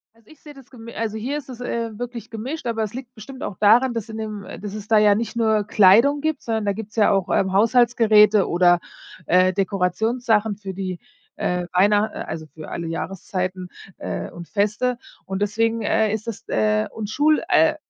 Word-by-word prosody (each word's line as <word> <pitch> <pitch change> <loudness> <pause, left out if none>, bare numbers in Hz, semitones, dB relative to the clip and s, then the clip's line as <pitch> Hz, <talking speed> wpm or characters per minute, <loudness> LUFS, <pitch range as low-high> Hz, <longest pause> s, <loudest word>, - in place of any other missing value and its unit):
Also, 230 -1 -27
ich 310 - -18
sehe 295 - -12
das 270 -3 -16
gemi 235 -2 -11
Also 220 -1 -3
hier 265 +7 -3
ist 280 -2 -9
es, 250 -1 -9
äh, 230 -3 -3
wirklich, 240 -2 -6
gemischt, 250 +8 -6
aber 225 -2 -1
es 215 - -5
liegt 255 0 -8
bestimmt 255 +4 -10
auch 195 - -5
daran, 235 +5 +4
dass 230 -1 -5
in 220 - -7
dem 215 -2 -5
äh, - - -9
dass 205 -1 -7
es 210 0 -7
da 220 -1 +4
ja 210 -1 +5
nicht 230 +2 -3
nur 220 -2 +2
Kleidung 215 +9 +5
gibt, 315 0 -1
sondern 220 -2 -2
da 200 - +1
gibt's 210 +1 -9
ja 215 -2 +4
auch, 195 -1 0
ähm, 190 -1 +1
Haushaltsgeräte 220 -2 +4
oder, 175 0 +4 0.5
äh, 185 +3 +3
Dekorationssachen 210 +4 0
für 195 -2 -7
die, 185 -2 -5 0.4
äh, 180 0 -2
einer 205 +3 +3
äh, - - -8
also, 160 0 -6
für 155 0 -11
alle 170 - -5
Jahreszeiten, 185 +2 -4 0.3
äh, - - -5
und 170 -1 -10
Feste 215 +4 0 0.3
und 190 +1 -4
deswegen, 225 +2 0
äh, 220 0 +1
ist 220 +1 -4
es, 230 - -6
äh 105 0 +1
und 215 -2 -6
Schul, 300 +6 +2
äh 315 -1 +4
215 Hz, 205 wpm, -22 LUFS, 195-235 Hz, 0.5 s, ja